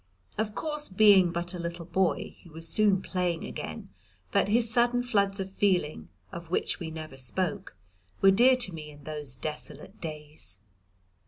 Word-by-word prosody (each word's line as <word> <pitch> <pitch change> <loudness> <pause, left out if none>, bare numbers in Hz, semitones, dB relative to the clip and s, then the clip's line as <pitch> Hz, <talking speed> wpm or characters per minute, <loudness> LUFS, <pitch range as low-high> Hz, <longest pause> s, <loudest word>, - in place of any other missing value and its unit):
Of 210 0 -2
course 300 -1 0
being 190 -2 +6
but 175 +1 -2
a 180 - -6
little 170 0 -5
boy 180 +1 0
he 175 - -16
was 165 +1 -1
soon 205 -3 +3
playing 180 -3 -2
again, 80 +4 -7 0.4
but - - +2
his 230 +3 +4
sudden 240 +2 +2
floods 200 -4 +1
of 190 - -2
feeling, 180 - 0 0.2
of 170 -1 -8
which 180 - -1
we 170 -3 -5
never 155 -3 -8
spoke, 160 +8 -2 0.4
were 195 - +6
dear 245 +6 +6
to 245 -8 0
me 155 -2 -8
in 145 -1 -14
those 150 -3 -6
desolate 155 +8 -8
days. 150 - -5
180 Hz, 165 wpm, -28 LUFS, 155-205 Hz, 0.4 s, being